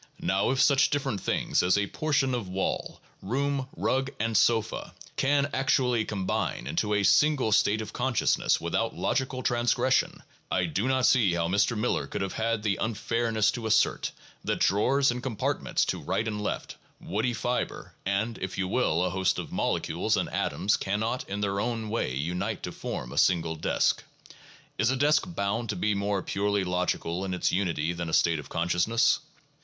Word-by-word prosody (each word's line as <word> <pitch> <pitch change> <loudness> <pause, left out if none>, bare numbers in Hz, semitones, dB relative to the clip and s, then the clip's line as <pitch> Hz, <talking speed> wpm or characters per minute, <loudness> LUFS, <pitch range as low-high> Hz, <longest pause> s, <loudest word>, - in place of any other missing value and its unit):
2 - - -9
Now 95 +3 +2
if 130 0 0
such 140 0 +5
different 135 -8 -1
things - - +1
as 90 +2 +3 0.2
portions 140 -4 +1
of 115 -7 -3
wall, 95 +1 -2 0.2
room, 135 +5 -1
rug, 135 +1 0
and 115 0 -1
sofa, 110 -2 +1 0.2
can 140 +1 +2
actually 125 -3 +2
combine 95 - -2
into 105 - 0
a 100 - +1
"single 125 +5 +3
state 105 +1 +3
of - - -9
consciousness" 125 -3 +1
without - - -1
logical 130 -1 -1
transgression, 120 +2 +1 0.3
I 95 -1 +1
do 95 +8 -1
not 130 -1 +2
see 110 -9 +4
how 85 -1 0
Mr. 100 +4 +2
Miller 115 +3 0
could - - -3
have 95 - -4
had 115 -1 -1
the 105 -3 +1
unfairness 115 -1 0
to 115 -2 -4
assert 110 +1 +2 0.3
that - - -1
drawers 135 +7 +3
and 125 0 -4
compartments 125 -5 -1
to - - -3
right 110 - -1
and 105 -1 -3
left, 105 - -4 0.2
woody 110 +5 -1
fiber, 120 +3 -3
and, 100 +4 -1
if 95 -1 -5
you 95 - 0
will, 90 -6 +1
a 90 - -1
host 95 0 +1
of - - -5
molecules - - 0
and - - -1
atoms 105 +2 0
cannot 110 +5 -2
in 100 +1 -3
their 100 -1 0
own 115 -1 -2
way 105 - -1
unite 90 +9 -3
to - - -4
form - - -5
a - - 0
single 85 -3 +2
desk. 80 - +1 0.8
Is 110 +3 +3
a 135 - +1
desk 145 +2 +3
bound 115 - -2
to 105 - -1
be 105 +4 0
more 100 -1 -1
purely 100 0 0
logical 90 -1 -1
in 95 -1 -2
its 90 - 0
unity 85 -4 0
than 85 -1 -4
a - - -6
state 85 -2 +3
of 75 - -10
consciousness? 90 +7 +2
105 Hz, 180 wpm, -27 LUFS, 95-125 Hz, 0.8 s, such